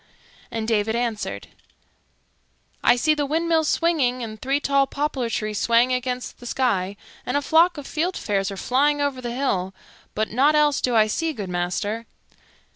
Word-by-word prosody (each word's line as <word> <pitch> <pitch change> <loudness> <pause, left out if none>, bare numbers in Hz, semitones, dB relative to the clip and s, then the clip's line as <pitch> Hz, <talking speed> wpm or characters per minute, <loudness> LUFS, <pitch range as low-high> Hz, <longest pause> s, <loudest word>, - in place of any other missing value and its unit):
And 225 -1 -4
David 220 0 +1
answered, 235 -3 -3 1.3
"I - - +6
see 310 +6 +2
the 295 -2 -1
windmills 320 +1 +1
swinging 270 -8 +1
and 215 -2 -7
three 275 +2 +1
tall 275 -1 +2
poplar 280 -5 -2
trees 215 -2 -2
swaying 235 +2 +3
against 250 0 -3
the 245 - -9
sky, 205 -7 0 0.3
and 250 - -1
a - - +3
flock 335 +3 +4
of 290 - -7
fieldfares 220 - -1
are 195 - -6
flying 290 +7 +2
over 285 -3 -1
the 240 - -4
hill; 190 -8 -1 0.4
but 215 +1 -1
nought 280 +7 +3
else 295 -2 +3
do 245 -2 +1
I 215 -1 +6
see, 320 +9 -1
good 205 -8 -6
master." 180 +6 -2
250 Hz, 165 wpm, -23 LUFS, 220-290 Hz, 1.3 s, I